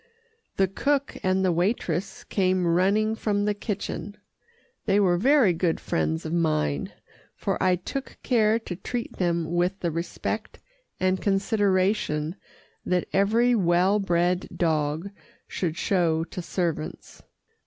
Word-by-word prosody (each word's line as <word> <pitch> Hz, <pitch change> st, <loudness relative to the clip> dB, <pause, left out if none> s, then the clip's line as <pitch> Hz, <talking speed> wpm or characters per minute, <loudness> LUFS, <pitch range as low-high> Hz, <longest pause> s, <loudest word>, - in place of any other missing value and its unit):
The 195 Hz, -, +4 dB
cook 280 Hz, +8 st, 0 dB
and 190 Hz, 0 st, +1 dB
the 185 Hz, -, +3 dB
waitress 185 Hz, 0 st, -1 dB
came 185 Hz, -2 st, +1 dB
running 195 Hz, +6 st, +2 dB
from 205 Hz, -2 st, 0 dB
the 210 Hz, -, +1 dB
kitchen. 205 Hz, 0 st, -5 dB, 0.7 s
They 200 Hz, 0 st, +4 dB
were 185 Hz, -3 st, +4 dB
very 245 Hz, 0 st, +4 dB
good 165 Hz, 0 st, 0 dB
friends 160 Hz, -1 st, -1 dB
of 160 Hz, -, -3 dB
mine, 155 Hz, -, 0 dB, 0.4 s
for -, -, -2 dB
I 185 Hz, -1 st, +4 dB
took 265 Hz, +10 st, -6 dB
care 220 Hz, -3 st, +3 dB
to 225 Hz, -6 st, -6 dB
treat 235 Hz, +6 st, -5 dB
them 170 Hz, -2 st, 0 dB
with 180 Hz, +3 st, 0 dB
the 170 Hz, -, 0 dB
respect 170 Hz, +2 st, -4 dB, 0.4 s
and 185 Hz, 0 st, +1 dB
consideration 195 Hz, -5 st, +1 dB, 0.5 s
that 180 Hz, -1 st, 0 dB
every 225 Hz, +5 st, +3 dB
well 185 Hz, 0 st, +3 dB
bred 180 Hz, -1 st, +1 dB
dog 160 Hz, +2 st, 0 dB, 0.4 s
should 170 Hz, -3 st, -3 dB
show 165 Hz, -4 st, +1 dB
to 180 Hz, -, -6 dB
servants. 170 Hz, -, -4 dB
185 Hz, 130 wpm, -26 LUFS, 170-205 Hz, 0.7 s, The